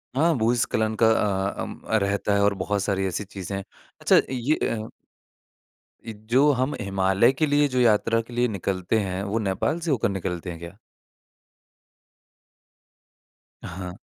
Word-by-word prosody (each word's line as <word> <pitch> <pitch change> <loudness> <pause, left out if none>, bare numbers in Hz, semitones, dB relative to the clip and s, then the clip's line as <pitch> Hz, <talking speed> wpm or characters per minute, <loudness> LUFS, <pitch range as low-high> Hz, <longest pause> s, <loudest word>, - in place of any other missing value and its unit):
हाँ, 165 +3 +3
भूस्खलन 110 -1 +1
का 110 - +6
अ, 100 -3 +1
अम, - - -7
रहता 100 -1 +1
है 100 - +2
और 100 0 +3
बहुत 100 +1 -1
सारी 95 -2 0
ऐसी 95 +3 -3
चीज़ें 95 -1 -7
हैं। 100 - -5 0.4
अच्छा - - +5
ये 130 +5 0 0.2
अ 110 0 -5 1.2
इ 115 - -6 0.2
जो 140 +4 +5
हम 130 +3 -1
हिमालय 95 +4 +2
के 155 +3 +1
लिए 145 0 +3
जो 130 -1 -1
यात्रा 115 0 +3
के 120 +1 -13
लिए 120 +1 +2
निकलते 95 0 -1
हैं, 95 -1 -3
वो 105 +3 -1
नेपाल 105 - -1
से 165 -1 -2
होकर 120 -6 +1
निकलते 90 -2 -4
हैं 85 -1 -7
क्या? 85 +4 -10 2.9
हाँ। 90 0 -7
105 Hz, 155 wpm, -24 LUFS, 95-120 Hz, 2.9 s, का